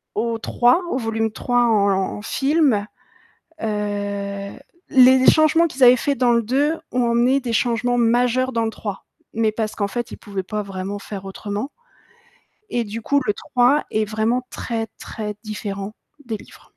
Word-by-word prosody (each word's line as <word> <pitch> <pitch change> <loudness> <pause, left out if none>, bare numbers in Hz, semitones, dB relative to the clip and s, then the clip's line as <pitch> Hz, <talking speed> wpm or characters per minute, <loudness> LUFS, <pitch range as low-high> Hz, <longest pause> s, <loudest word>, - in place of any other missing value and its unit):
au 230 +1 -1
3, 245 +8 +2
au - - 0
volume 225 -2 -1
3 245 +2 +1
en 210 -3 +3 0.3
en - - -8
film, 270 -4 +1 0.8
heu, 205 -2 -3 0.4
les 260 0 +6
changements 315 +2 +4
qu'ils 270 -3 -9
avaient 245 +1 +9
faits 280 +3 -1
dans 245 -2 +3
le 235 - +2
2 285 +8 +1
ont 245 -2 +1
amené 245 +4 +3
des 245 -3 -4
changements 245 +1 +1
majeurs 245 +2 +2
dans 230 -1 0
le 225 - 0
3, 205 -3 -6 0.3
mais 220 -1 +1
parce 215 -1 -3
qu'en 200 -2 -1
fait, 240 +3 -4
ils - - -7
pouvaient 200 -2 -5
pas 210 +3 -3
vraiment 195 +1 -5
faire 200 -1 -7
autrement 205 +6 -5 1.0
et 240 -1 0
du 220 +2 -6
coup, 285 +5 +2
le 210 - +1
3 250 +7 +2
est 215 0 +1
vraiment 225 +4 -1
très, 225 -2 -4
très 210 -2 -6
différent 205 -1 -5 0.3
des 225 -2 -3
livres. - - -17
230 Hz, 170 wpm, -21 LUFS, 210-250 Hz, 1.0 s, avaient